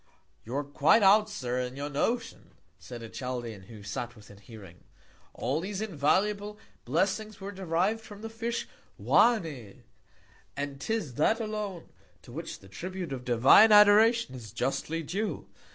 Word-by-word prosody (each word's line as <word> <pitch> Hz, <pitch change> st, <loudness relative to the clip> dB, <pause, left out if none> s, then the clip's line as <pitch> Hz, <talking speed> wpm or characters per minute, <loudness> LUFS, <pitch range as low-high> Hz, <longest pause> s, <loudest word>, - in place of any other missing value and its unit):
You 120 Hz, +4 st, -6 dB
are 145 Hz, -, 0 dB
quite 145 Hz, +9 st, +3 dB
out, 210 Hz, +2 st, +6 dB
Sir, 125 Hz, -11 st, -3 dB
in 125 Hz, 0 st, -4 dB
your 140 Hz, +1 st, -4 dB
Notion, 230 Hz, -, -3 dB, 0.2 s
said 120 Hz, -2 st, -9 dB
a -, -, -6 dB
Chaldean, 120 Hz, -5 st, -6 dB
who 110 Hz, -3 st, -11 dB
sat 120 Hz, +4 st, -5 dB
within 105 Hz, -2 st, -15 dB
Hearing: 100 Hz, -4 st, -14 dB, 0.5 s
All 135 Hz, +6 st, -1 dB
these 195 Hz, +2 st, -4 dB
invaluable 205 Hz, +3 st, 0 dB, 0.3 s
Blessings 195 Hz, -, -1 dB
were 195 Hz, +1 st, -6 dB
deriv'd 190 Hz, +3 st, -1 dB
from 210 Hz, -1 st, -12 dB
the -, -, -3 dB
Fish 230 Hz, +1 st, -3 dB, 0.3 s
Oannés; 160 Hz, -, +1 dB, 0.7 s
and 140 Hz, -1 st, -4 dB
'tis 215 Hz, -, -2 dB
that 225 Hz, +8 st, +3 dB
alone 210 Hz, -5 st, -5 dB, 0.3 s
to -, -, -13 dB
which -, -, -7 dB
the 95 Hz, -, -15 dB
Tribute 175 Hz, -, -6 dB
of 125 Hz, -2 st, -6 dB
divine 125 Hz, -, +6 dB
Adoration 210 Hz, -, +6 dB
is 115 Hz, -5 st, -9 dB
justly 135 Hz, +7 st, -2 dB
due. 200 Hz, +8 st, -3 dB
165 Hz, 150 wpm, -29 LUFS, 125-210 Hz, 0.7 s, out